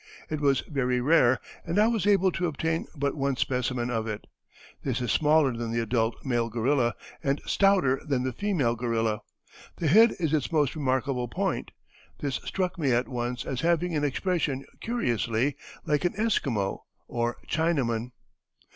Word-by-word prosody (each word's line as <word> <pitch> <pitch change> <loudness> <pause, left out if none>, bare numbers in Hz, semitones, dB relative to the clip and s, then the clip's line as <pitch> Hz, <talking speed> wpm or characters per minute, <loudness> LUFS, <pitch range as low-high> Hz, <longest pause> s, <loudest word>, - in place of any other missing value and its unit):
It 155 -1 -2
was 140 -2 +3
very 125 -4 -1
rare, 130 -2 +4 0.2
and 170 - -2
I 210 - +6
was 225 -4 0
able 195 -2 +4
to 180 0 -1
obtain 160 +1 -1
but 140 -1 0
one 140 -2 0
specimen 125 -1 -1
of 115 -1 -1
it. 105 -1 -5 0.6
This 130 -3 -1
is 120 -4 -1
smaller 150 -3 +4
than 115 0 -3
the 115 - 0
adult 115 0 0
male 120 -3 0
gorilla, 120 +2 +1 0.3
and 140 +1 +1
stouter 190 -10 +3
than 135 -5 0
the 130 -1 -2
female 160 - 0
gorilla. 115 -2 0 0.6
The 170 - -4
head 225 +8 +6
is 160 -3 0
its 150 -1 0
most 150 -3 +2
remarkable 130 -3 0
point. - - -2 0.5
This 140 -3 -1
struck 185 -1 -2
me 140 -5 +2
at 120 +1 +2
once 120 -1 -3
as 130 -1 -3
having 170 0 +1
an 150 - 0
expression 145 -2 -1
curiously 125 - 0 0.3
like 150 +1 +1
an 175 - 0
Esquimau 135 - 0 0.3
or 120 0 -1
Chinaman." 135 -8 0
135 Hz, 165 wpm, -27 LUFS, 120-160 Hz, 0.6 s, I